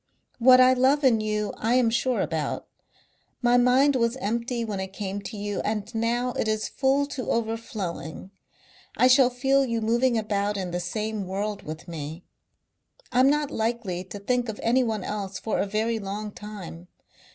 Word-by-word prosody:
What 255 +1 +7
I 255 0 +7
love 265 +3 +3
in 235 -5 +4
you 210 -1 -1
I 230 +3 +1
am 245 -3 +3
sure 250 +1 +1
about. - - -2 0.8
My 240 0 +4
mind 255 +3 +4
was 235 0 +1
empty 235 +1 -2
when 205 -3 -4
it 190 0 -5
came 200 0 -4
to 210 +2 -7
you 205 0 -3
and 210 -1 -3
now 235 +2 0
it 225 - -2
is 215 0 0
full 275 +1 +1
to 280 -3 -5
overflowing. 215 -7 -3 0.7
I - - +5
shall 255 0 +6
feel 270 +2 +2
you 230 -3 -1
moving 235 +2 +2
about 205 -1 -1
in 185 -2 -3
the 175 - -2
same 210 +2 -3
world 200 +2 -3
with 155 +1 -8
me. 160 0 -6 0.9
I'm 255 +2 +5
not 295 0 +1
likely 220 -6 -2
to 195 - -8
think 245 +4 -1
of 215 - -5
anyone 230 -4 +1
else 200 -2 -4
for 220 - -2
a - - 0
very 220 +3 -1
long 205 +1 -5
time.... 195 -5 -9
220 Hz, 175 wpm, -26 LUFS, 200-250 Hz, 0.9 s, What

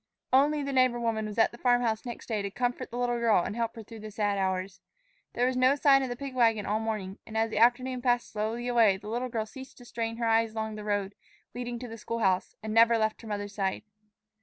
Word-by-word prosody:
ONLY 290 +2 +4
the 275 0 -3
neighbor 255 -2 +3
woman 225 -2 -1
was 210 - -7
at 225 - +4
the 235 - -13
farm 245 -1 +3
house 220 +1 -1
next 240 - -7
day 220 -3 -2
to 200 - -3
comfort 245 +4 -2
the 240 - -6
little 240 -1 0
girl 225 -6 +3
and 210 - -4
help 230 0 -2
her 225 - -8
through 225 +1 -11
the 215 0 -8
sad 205 -1 0
hours. 190 -1 -2 0.5
There 245 - +1
was 255 0 0
no 255 +2 +4
sign 275 -1 +5
of 260 - -2
the 245 - -3
pig 275 +1 -6
wagon 225 -4 +2
all 210 +2 0
morning, 215 -4 -4
and 220 0 -5
as 225 0 +1
the 215 - -1
afternoon 250 +2 +3
passed 245 -1 +1
slowly 220 +3 -3
away 230 -5 +4
the 210 +2 -9
little 245 +3 -2
girl 225 -2 -2
ceased 265 +4 -11
to 245 - -14
strain 230 -1 -4
her 235 - -1
eyes 225 0 +2
along 220 0 -3
the 210 0 -7
road 205 -1 -1 0.4
leading 245 0 -4
to 250 +1 -7
the 225 -1 -9
school 230 +2 -4
house, 190 -5 +1
and 220 0 -3
never 230 +1 +6
left 220 -1 -1
her 225 - -11
mother's 205 -1 -4
side. 195 -2 -2
230 Hz, 260 wpm, -29 LUFS, 215-245 Hz, 0.5 s, never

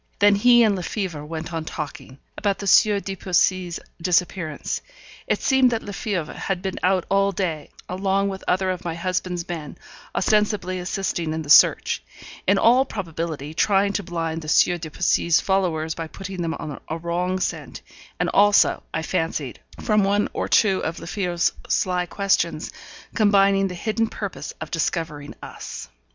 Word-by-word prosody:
Then 205 0 +5
he 240 +4 +6
and 210 -3 +3
Lefebvre 180 -4 -4
went 160 +2 -6
on 165 -1 -2
talking 145 -4 -7 0.2
about 200 -1 0
the 200 - -6
Sieur 205 +1 +5
de 195 0 -5
Poissy's 180 -1 +1 0.2
disappearance. 175 -2 -1 0.5
It - - 0
seemed 265 -2 +4
that 230 -2 -2
Lefebvre 200 -5 -3
had 185 -2 -3
been 190 -1 -3
out 185 -1 +2
all 195 0 +2
day, 170 -6 -3 0.2
along 195 +1 0
with 190 -1 -6
other 185 +1 +1
of 180 -1 -5
my 170 -2 -3
husband's 180 0 -2
men, 160 -4 -6 0.4
ostensibly 205 -2 +1
assisting 180 -3 -2
in 160 - -3
the 145 - -2
search; 150 - +6 0.5
in 195 +1 +4
all 245 +6 +5
probability 165 - -5
trying 200 +3 +2
to 205 - -1
blind 165 -3 -3
the 155 - -9
Sieur 175 +2 +4
de 160 -1 -6
Poissy's 170 +1 +2
followers 170 -5 0
by 165 -1 -5
putting 190 +1 -7
them 165 -1 -2
on 150 -3 -6
a 160 - -2
wrong 175 +2 -1
scent, - - -4 0.4
and - - +1
also, 205 0 +4
I 160 - -2
fancied, 160 -6 -2 0.2
from 210 -2 +2
one 200 +1 +1
or - - -2
two 195 -4 +3
of 165 - -3
Lefebvre's 175 -1 -1 0.2
sly 180 -1 +1
questions, 200 +2 0 0.4
combining 200 -2 +4
the 180 - -6
hidden 225 +4 -1
purpose 200 -3 -6
of 155 - -7
discovering 155 -3 -2
us. - - -8
185 Hz, 165 wpm, -23 LUFS, 165-200 Hz, 0.5 s, he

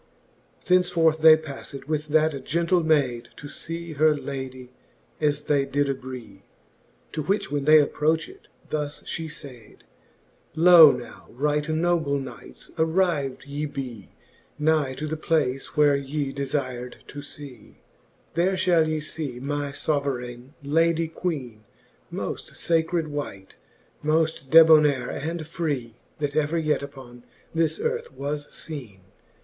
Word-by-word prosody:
XX. - - -30
Thence 180 -1 +4
forth 160 -2 +3
they 160 0 +9
pafTed 140 -3 -7
with 155 0 -2
that 155 -2 +2
gentle 170 +4 +1
mayd, 140 -7 +1
To 145 - -9
fee 165 +2 -6
her 155 +1 +3
ladie, 130 -3 -6 0.5
as 145 -1 +1
they 145 -2 +2
did 145 +1 0
agree. 125 -7 -6 0.7
To 155 - -3
which 200 +3 -1
when 145 -1 -1
fhe 155 +1 +8
approched, 160 - -1 0.2
thus 150 -1 -3
fhe 160 -1 -5
fayd; 125 -7 -11 0.7
Loe 165 -2 +9
now, 125 -2 -8
right 150 +4 -1
noble 160 -3 +1
knights, 135 -2 -9
arrivd 160 -5 +1
ye 145 +2 -3
bee 125 -8 -7 0.5
Nigh 150 -3 +1
to 150 - -4
the 155 +1 -2
place, 150 -5 -1
which 145 -2 +4
ye 140 -1 -2
delir'd 130 -3 -4
to 145 - -7
fee: 140 -5 -11 0.6
There 185 +3 +2
fhall 170 -4 +3
ye 155 0 -1
fee 150 -5 -5
my 145 +2 -2
fbverayne 135 -3 -3
Lady 165 +2 +2
Qiieene 145 -10 -4 0.5
Moft - - -5
facred 165 0 +1
wight, 145 -11 -6 0.5
mofl: 155 -2 0
debonayre 155 -4 +6
and 165 0 -3
free, 145 -8 -3 0.2
That 145 -1 -3
ever 155 +2 +1
yet 155 -3 +1
upon 130 -4 -10 0.3
this 165 - +1
earth 470 +1 -2
was 145 +1 -4
feene. 125 -12 -8
150 Hz, 135 wpm, -25 LUFS, 135-160 Hz, 0.7 s, they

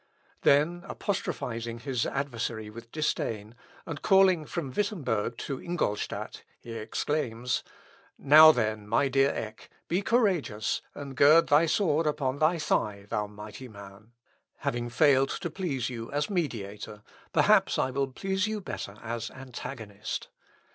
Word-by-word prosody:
" - - -35
Then 155 +5 +2
apostrophising 115 - -3
his 130 -4 -1
adversary 115 -5 -3
with 115 +1 -11
disdain, 115 -8 -2 0.3
and 150 -4 -6
calling 190 -5 +5
from 150 -4 -4
Wittemberg 125 - -1
to 135 -2 -4
Ingolstadt, 170 -12 -3 0.2
he 120 - -10
exclaims 115 +1 -2 0.5
"Now, 155 +3 +9
then, 110 -5 -1
my 135 +6 +2
dear 135 +1 +4
Eck, 110 -4 -6 0.2
be 180 +4 +1
courageous, 190 - +1
and 140 -2 -7
gird 155 +5 +6
thy 150 +3 +5
sword 165 -3 +2
upon 140 -2 -1
thy 160 +3 +3
thigh, 105 -10 -1
thou 105 0 -1
mighty 105 +5 -9
man. 100 +1 -13 0.5
Having 120 0 -2
failed 135 +2 +4
to 170 - -4
please 140 -9 -2
you 115 -2 -6
as 145 +9 -1
mediator, 105 - -4 0.3
perhaps - - +4
I 130 - +1
will 135 +1 0
please 190 +8 -1
you 215 0 -2
better 105 - -6
as 115 0 -4
antagonist. 120 -5 -7
130 Hz, 135 wpm, -28 LUFS, 110-155 Hz, 0.5 s, Now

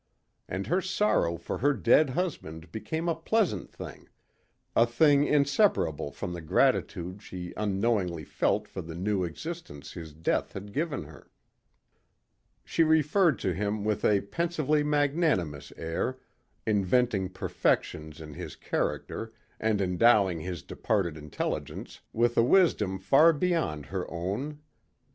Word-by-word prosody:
And 95 +2 -3
her 180 +2 +1
sorrow 190 - +1
for 85 - -5
her 145 +4 +3
dead 135 +5 +4
husband 90 - -4
became 160 +9 -3
a 170 - +3
pleasant 165 - 0
thing, - - -10 0.7
a 115 - +5
thing 145 +4 +4
inseparable 140 - +2
from 90 +2 -5
the 85 - -6
gratitude 90 +4 +1
she 90 -4 -7
unknowingly 100 -4 0
felt 105 +7 0
for 95 - -6
the 80 -1 -8
new 95 +2 0
existence 90 - -7
his 80 -3 -8
death 80 - -1
had 100 +1 -8
given 150 - -1
her. 75 0 -14 1.4
She 165 - +2
referred 160 +1 +3
to 95 - 0
him 105 +2 -2
with 105 -1 -1
a 100 -2 +4
pensively 155 +4 0
magnanimous 145 - +1
air, 85 +11 -2 0.5
inventing 105 -1 +2
perfections 80 -4 -1
in 75 -2 -9
his - - -7
character 115 0 -3 0.3
and 110 -2 +1
endowing 95 -1 +4
his 85 -1 -5
departed 95 -7 -1
intelligence 75 -1 -5
with 120 +1 +2
a 115 - +6
wisdom 120 - +3
far 140 - +5
beyond 160 - 0
her - - -4
own. 105 - -4
105 Hz, 130 wpm, -28 LUFS, 90-150 Hz, 1.4 s, a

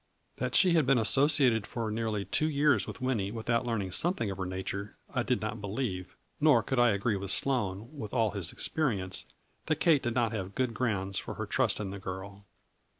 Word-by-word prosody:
That 125 0 -2
she 185 -2 +6
had 160 -6 +3
been 135 -1 +5
associated 130 -2 +4
for 115 -3 -3
nearly 110 -2 -2
two 155 - +1
years 145 0 +3
with - - -8
Winnie 115 -7 0
without 115 +2 -1
learning 105 -5 -1
something 140 - 0
of 95 - -7
her 95 - -2
nature, 95 +2 -5 0.2
I - - +1
did - - 0
not 110 - -4
believe, 100 -3 -4 0.2
nor 150 -7 +5
could 130 0 -1
I 120 0 +6
agree 100 +1 +1
with 95 0 -5
Sloane, 110 -5 0
with 110 -8 -6
all 115 -4 +2
his 95 -5 -2
experience, 100 -12 -2 0.4
that 155 - +2
Kate 155 -2 +3
did 120 -1 -2
not 120 -3 +2
have 100 -3 -5
good 125 -3 0
grounds 100 -6 -1
for - - -6
her - - -3
trust - - +1
in 100 -2 -4
the 100 - -6
girl. 95 +2 -7
115 Hz, 205 wpm, -30 LUFS, 100-130 Hz, 0.4 s, she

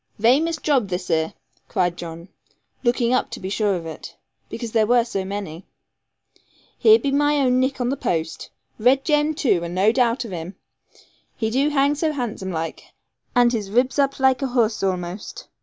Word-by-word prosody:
'Vamous 285 +10 +3
job 275 -9 +1
this 180 -1 -4
here,' 160 -1 0 0.3
cried 175 -2 0
John, 170 0 -8 0.6
looking 240 0 +2
up 255 - +1
to - - -7
be 190 - -5
sure 205 -1 +1
of 170 -2 -5
it, 160 - -9 0.3
because 235 -3 -6
there 220 -1 +2
were 240 0 +4
so 195 -5 -3
many; 190 -3 -6 1.1
'here 440 0 +7
be 280 -10 -2
my 290 +1 +2
own 255 -2 +3
nick 260 +1 0
on 245 -1 0
the 275 - 0
post. 160 - -3 0.3
Red 260 +4 +3
Jem, 300 0 +2
too, 235 - +1
and 170 +1 -5
no 195 +4 +4
doubt 240 0 +1
of 220 - -8
him; 175 +2 -6 0.8
he 220 -2 -2
do 275 +5 +2
hang 285 0 +2
so 310 +1 -1
handsome 220 -8 -4
like, 165 -1 -4 0.5
and 245 0 +4
his 210 -4 -2
ribs 250 +6 +1
up 275 0 +2
laike 265 0 +3
a 270 - 0
horse 235 -3 +1
a'most. 185 +1 -4
235 Hz, 185 wpm, -22 LUFS, 185-270 Hz, 1.1 s, here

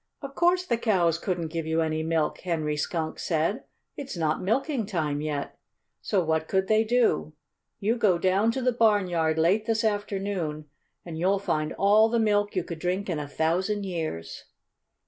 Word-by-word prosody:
"Of 275 0 -6
course 355 +3 +2
the 235 -8 0
cows 175 -8 +2
couldn't 175 -4 -2
give 165 -1 -3
you 160 +1 +1
any 155 -1 -1
milk!" 160 -1 0
Henry 155 -4 -2
Skunk 160 +2 -3
said. 165 +4 -1 0.3
"It's 270 -8 -6
not 155 -2 0
milking 235 +3 0
time 155 -7 -1
yet. 150 -2 -4 0.4
So 195 -4 +1
what 160 0 0
could 190 0 +1
they 215 0 +4
do? 230 -9 +1 0.5
You 220 +4 0
go 205 -6 +3
down 190 +5 +2
to 260 - -3
the 250 - +3
barnyard 185 -8 +2
late 190 +7 +2
this 225 0 +1
afternoon 195 -7 -2 0.4
and 165 -2 -6
you'll 190 +3 +2
find 155 -6 -1
all 210 +3 +4
the 235 - +1
milk 205 -2 +1
you 185 - +1
could 170 -1 -7
drink 185 +3 -2
in 160 - -2
a 145 - -5
thousand 185 +7 0
years." 160 - -5
185 Hz, 175 wpm, -26 LUFS, 160-215 Hz, 0.5 s, they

